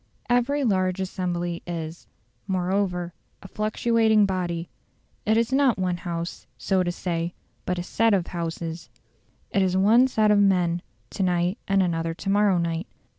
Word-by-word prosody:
Every 265 +4 +2
large 185 -5 +1
assembly 175 -2 -2
is, 165 -1 -6 0.4
moreover, 180 -2 -1 0.3
a - - -9
fluctuating 220 +1 +2
body; 175 -3 -2 0.6
it 220 +1 +4
is 230 +2 +1
not 270 -4 +3
one 180 -2 -1
house, 170 -1 -5
so 185 +11 +1
to 175 -1 0
say, 170 -1 -3 0.3
but 180 - 0
a 175 - -2
set 225 +3 +2
of 180 -3 0
houses; 165 -1 -5 0.6
it 200 - +2
is 185 -1 +2
one 225 +7 +5
set 215 -4 +2
of 205 - +5
men 180 -3 +2 0.3
to - - -4
night 180 +1 +1
and 195 -1 +3
another 165 -2 -1
to 195 - -5
morrow 205 -2 +3
night. 170 +2 -2
185 Hz, 155 wpm, -25 LUFS, 175-205 Hz, 0.6 s, one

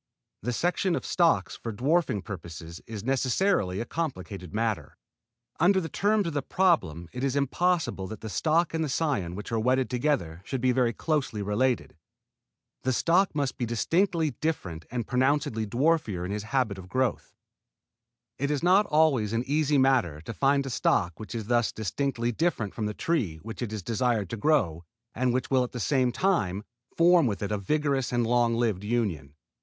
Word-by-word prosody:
The 125 - -2
selection 175 +6 0
of - - -4
stocks 170 -2 +2
for 115 - -6
dwarfing 130 - +1
purposes 85 -3 -8
is 110 -3 -6
necessarily 130 - +1
a 115 - -2
complicated 95 - -5
matter. 105 -9 -2 0.6
Under 190 +3 +4
the 165 -3 -4
terms 205 +5 +1
of 165 - -3
the 145 - 0
problem 95 - +1
it 125 +1 -4
is 135 -1 0
impossible 145 - 0
that 110 +1 -8
the 110 - -6
stock 160 +9 +1
and 160 0 0
the 155 - -2
cion 130 - -1
which 105 +3 -7
are 115 - +1
wedded 130 +3 +1
together 120 - -1
should 135 +5 -3
be 130 +1 +2
very 125 -2 +2
closely 135 -7 -1
related. 120 +5 0 0.9
The 130 - 0
stock 175 +7 +2
must 140 -3 -1
be 120 - 0
distinctly 165 - +1
different 90 - -3
and 120 -2 -3
pronouncedly 125 -3 +1
dwarfer 120 - +1
in 95 - -4
his 105 +1 -3
habit 115 -7 0
of 90 -1 -11
growth. 130 +2 -1 1.0
It 140 +2 0
is 150 +1 -1
not 190 +4 +5
always 145 -9 +3
an 115 +1 0
easy 150 0 +2
matter 130 - +2
to 100 +8 -7
find 140 +2 +2
a 135 - -4
stock 90 -7 +1
which 110 +2 -7
is 110 -2 -3
thus 120 0 +2
distinctly 120 +2 -2
different 115 - -1
from 110 -2 -2
the 105 - -4
tree 125 - 0
which 115 +3 -7
it 120 -4 -3
is 110 -3 -5
desired 115 -3 0
to - - -2
grow 100 - +1 0.3
and 125 +1 +1
which 125 +2 -2
will 130 -1 +4
at 125 - -6
the 125 - -4
same 130 +1 +2
time 105 - 0 0.3
form 170 -3 +5
with 105 -2 -2
it 100 - -3
a 105 - +1
vigorous 140 +3 0
and 120 -1 +1
long 120 0 +2
lived 110 -5 0
union. 100 - -2
125 Hz, 185 wpm, -27 LUFS, 105-150 Hz, 1.0 s, not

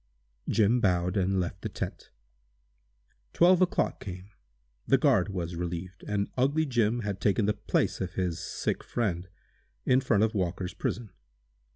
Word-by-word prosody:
Jim 115 +2 +3
bowed, 90 -3 +1
and 95 -1 +1
left 90 0 -3
the - - -3
tent. - - -6 1.2
Twelve 180 +1 +5
o'clock 180 - +1
came; 95 +1 -8 0.6
the - - +5
guard - - +3
was 90 -3 -4
relieved, 90 +1 -5
and 100 -1 0
"ugly 145 +5 +2
Jim" 120 -3 +1
had 100 -2 -4
taken 105 +1 +2
the 105 - +2
place 105 -1 -1
of 90 -1 -3
his 90 -3 -1
sick - - -3
friend, 95 -6 -2 0.6
in 130 +1 +4
front 115 -6 +2
of 110 - +1
Walker's 90 -2 -2
prison. 115 -5 -3
100 Hz, 150 wpm, -29 LUFS, 90-115 Hz, 1.2 s, Twelve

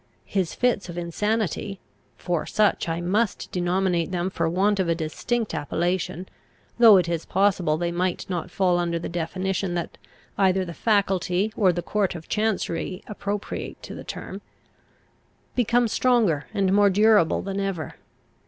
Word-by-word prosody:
His 185 -4 -1
fits 240 -7 0
of 175 - -7
insanity 195 +2 -2 0.4
for 175 -3 -2
such 210 -5 +1
I 165 +1 -2
must 200 +4 -1
denominate 180 -1 0
them 180 0 -2
for 165 -2 0
want 200 +4 +2
of 185 -3 +1
a 165 - +2
distinct 210 +8 -2
appellation, 175 +4 -2 0.5
though 225 -4 +9
it 180 -2 +2
is 170 -1 -2
possible 185 -5 +1
they 170 +1 -1
might 180 +1 -1
not 180 -1 -3
fall 180 -1 +2
under 170 -1 0
the 165 - -4
definition 185 +2 -2
that 170 - -4 0.4
either 190 -1 +3
the 170 - -7
faculty 195 -1 +1
or 195 -5 +4
the 175 0 -3
court 205 -4 0
of 165 -1 -9
chancery 200 -3 -1
appropriate 205 -1 -5
to - - -8
the - - -8
term - - -7 1.1
became 240 0 +3
stronger 220 - +2
and 195 -3 +1
more 205 0 +5
durable 205 -3 +4
than 195 0 -3
ever. 195 -5 -3
185 Hz, 155 wpm, -24 LUFS, 175-205 Hz, 1.1 s, though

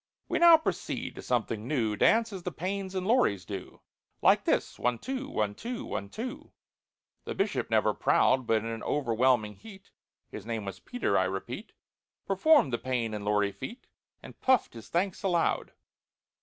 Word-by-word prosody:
"We - - 0
now 340 -1 +9
proceed 315 - -3
to - - -9
something 115 -2 -1
new— 115 -7 0
Dance 225 - +3
as 190 - -6
the 180 - -4
PAYNES 190 +3 -4
and 185 -1 -2
LAURIS 150 - +2
do, 100 -3 -8 0.4
Like - - +5
this—one, 125 0 0
two—one, 255 - -3
two—one, 235 - -5
two." 240 - -7 0.7
The - - -4
Bishop, - - -1
never - - +3
proud, 130 -2 +2
But 110 -1 +2
in - - -6
an 115 0 -4
overwhelming 120 -5 +1
heat 200 -3 -14 0.4
(His - - -8
name 110 -1 -4
was 100 - -6
PETER, 245 - 0
I - - +2
repeat) - - -5 0.5
Performed 195 - +4
the 120 - 0
PAYNE 120 -4 -2
and 105 -1 -4
LAURI 105 -1 +2
feat, 130 - -8 0.4
And - - -13
puffed 260 -3 +3
his 115 -3 -11
thanks 185 +2 -1
aloud. 175 -4 +1
130 Hz, 160 wpm, -29 LUFS, -, 0.7 s, now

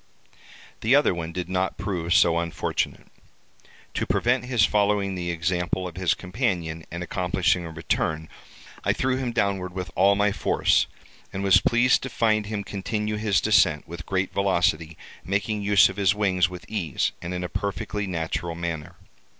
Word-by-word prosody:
The 115 +5 +3
other 145 -8 +4
one 85 -1 -5
did 90 0 -4
not 95 +1 -1
prove 85 -4 -3
so 85 -4 +4
unfortunate. 85 -1 -2 0.9
To - - -2
prevent 120 0 +1
his 120 -4 +3
following 100 -1 +1
the 90 -1 -3
example 90 +2 -1
of 85 - -9
his 90 -3 +1
companion, 90 -6 -2
and 85 +2 -5
accomplishing 90 0 0
a - - -7
return, 80 0 -2 0.6
I - - +2
threw 130 0 0
him 130 -2 -2
downward 95 -4 -1
with 90 -4 -5
all 100 +2 +5
my 105 0 +2
force, - - +2 0.4
and 95 - -4
was 95 -1 +5
pleased 125 +1 +3
to 135 - -5
find 110 -3 +1
him 105 -1 -3
continue 105 +2 -3
his 105 -2 +2
descent, 75 -1 +3
with 85 +1 -8
great 95 0 -1
velocity, 85 -4 +1 0.3
making 100 +2 -1
use 100 0 +5
of 95 - -7
his 100 -1 +3
wings 95 -4 +2
with 90 -3 -9
ease, 85 - -1
and 85 - -5
in 90 0 -3
a - - -2
perfectly 100 +2 -3
natural 85 -1 -3
manner. 85 -3 -5
95 Hz, 165 wpm, -25 LUFS, 85-105 Hz, 0.9 s, all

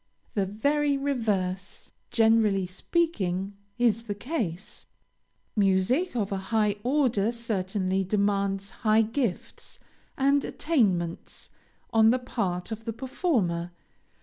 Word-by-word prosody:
The 195 -3 0
very 285 +8 +1
reverse, 205 -9 -2 0.2
generally 220 -4 +3
speaking, 195 - -1 0.2
is 230 -2 +2
the 205 -2 -3
case. 210 - -4 0.7
Music 205 - +2
of 205 -4 -1
a 195 - 0
high 210 -2 +2
order 245 -5 +2
certainly 195 -4 -1
demands 200 0 0
high 220 -1 +3
gifts 225 -2 -3 0.4
and 275 +1 +3
attainments 190 - -1 0.4
on 220 0 +5
the 250 - +4
part 200 -7 -3
of 220 0 -6
the 230 - -3
performer. 220 - -1
215 Hz, 105 wpm, -27 LUFS, 195-245 Hz, 0.7 s, on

